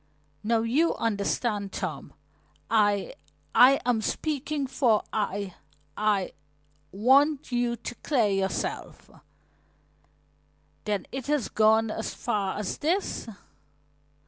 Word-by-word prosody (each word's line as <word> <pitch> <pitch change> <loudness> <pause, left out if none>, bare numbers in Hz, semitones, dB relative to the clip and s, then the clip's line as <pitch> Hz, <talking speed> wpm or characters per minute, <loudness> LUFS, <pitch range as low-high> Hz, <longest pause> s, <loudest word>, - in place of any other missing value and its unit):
"Now 225 +1 +2
you 270 +9 +2
understand, 205 -1 -1
Tom. - - -5 0.6
I 205 -3 +2 0.4
I 265 +2 +7
am 240 -3 +2
speaking 295 +3 -2
for 255 -5 +2
I 200 -3 -2 0.4
I 210 -3 0 0.6
want 270 +8 +3
you 240 -1 +1
to 240 - -7
clear 245 -2 +1
yourself." 195 -1 -3 1.7
"Then 210 -2 -1
it 265 0 -5
has 290 -7 0
gone 220 0 +3
as 220 - -4
far 205 -5 -2
as 210 -2 -3
this?" 345 0 -1
225 Hz, 100 wpm, -27 LUFS, 205-265 Hz, 1.7 s, I